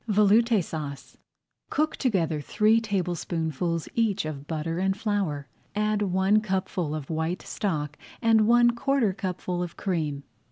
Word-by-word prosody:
VELOUTE 210 0 +4
SAUCE 150 -4 -6 0.5
Cook 310 +1 0
together 170 - 0
three 215 +9 +3
tablespoonfuls 170 -5 -2
each 215 -6 +1
of 145 -2 -6
butter 165 +1 -2
and 190 +1 +1
flour, 195 -10 -1 0.3
add 210 0 +1
one 195 +2 +3
cupful 185 -6 -2
of 155 0 -6
white 160 +3 -2
stock 150 -7 -2 0.2
and 225 -2 +4
one 240 0 +6
quarter 240 -3 +1
cupful 180 -1 -3
of 175 -1 -5
cream. 155 -7 -2
190 Hz, 130 wpm, -26 LUFS, 160-215 Hz, 0.5 s, one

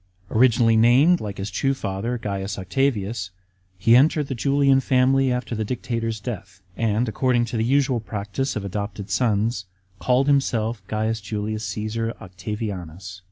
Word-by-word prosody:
Originally 115 -1 +4
named, 130 +10 +5
like 105 -2 -5
his 100 +2 -4
true 135 +8 0
father, 110 +2 -3
C. - - 0 0.3
Octavius,* 105 -1 -1 0.5
he 115 +5 +5
entered 145 +2 +4
the - - -1
Julian 135 +2 +3
family 130 0 +3
after 125 -1 -2
the 110 -1 -1
dictator's 115 -1 -3
death, 100 -4 -7 0.2
and, 115 +1 0
according 120 +1 +1
to 120 - -6
the 110 - +1
usual 130 0 +2
practice 105 +5 -3
of 105 -2 -3
adopted 100 +1 -5
sons, 110 -3 +1 0.3
called 130 +2 +2
himself 120 -5 +1
C. 110 +1 0
Julius 105 0 -3
Csesar 110 +2 -3
Octavianus. 95 -2 -6
115 Hz, 145 wpm, -23 LUFS, 105-130 Hz, 0.5 s, named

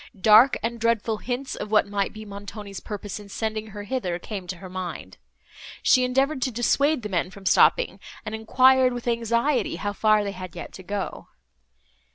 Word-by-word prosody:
Dark 220 +6 +7
and 235 +1 -2
dreadful 225 -1 +1
hints 250 +4 -4
of 210 - -6
what 215 0 +4
might 200 -1 -1
be 215 0 -10
Montoni's 200 0 -8
purpose 205 -1 -6
in 205 -1 -12
sending 220 +1 -3
her 205 -1 -8
hither, 205 -6 -2
came 190 0 -7
to 180 - -5
her 185 - -10
mind. 175 - -6 0.7
She 255 - +5
endeavoured 270 +3 +1
to 255 - 0
dissuade 260 +4 +1
the - - -2
men 180 -1 -1
from 195 +1 -13
stopping, - - +4 0.3
and 215 - -5
enquired, 255 +3 +4
with 245 0 -6
anxiety, 235 +2 +1
how 205 0 -3
far 215 0 +3
they 200 - -3
had 185 -3 -9
yet 175 - -8
to - - -9
go. 195 +2 -5
215 Hz, 185 wpm, -25 LUFS, 200-245 Hz, 0.7 s, Dark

